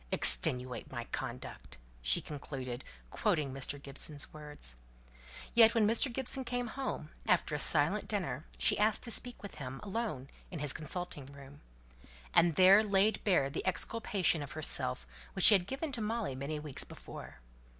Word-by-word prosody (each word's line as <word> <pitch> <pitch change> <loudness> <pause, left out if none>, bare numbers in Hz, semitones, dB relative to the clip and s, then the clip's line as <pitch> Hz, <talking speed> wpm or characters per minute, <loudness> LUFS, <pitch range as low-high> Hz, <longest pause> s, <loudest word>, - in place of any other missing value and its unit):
'Extenuate 125 0 +3
my - - -4
conduct!'" - - -6 0.2
she - - +3
concluded, 135 -4 -6 0.3
quoting 140 -3 0
Mr. 135 +1 -3
Gibson's 145 +1 -4
words. 150 - -7 0.8
Yet 230 -1 +7
when 225 -2 +4
Mr. 230 +5 +2
Gibson 265 +2 +1
came 245 0 -2
home, 260 - -4 0.2
after 175 -3 +2
a 150 - -1
silent 160 +8 +1
dinner, 180 -7 -3
she - - +3
asked 215 +1 +2
to 235 - 0
speak 245 0 0
with 200 - -7
him, 130 0 -6
alone, 195 - -4 0.2
in 175 - -6
his 145 -2 0
consulting 155 -3 -4
room; 140 +1 -13 0.7
and 165 -2 +4
there 190 +3 +7
laid 205 0 +2
bare 180 -9 +3
the 150 - -4
exculpation 185 -3 0
of 140 -2 -7
herself 65 - -2 0.3
which - - +5
she - - +12
had 190 -2 +3
given 275 +5 -4
to 245 -4 -4
Molly 215 - -2
many 140 +4 -4
weeks 150 -2 -4
before. - - -10
165 Hz, 160 wpm, -33 LUFS, 140-215 Hz, 0.8 s, she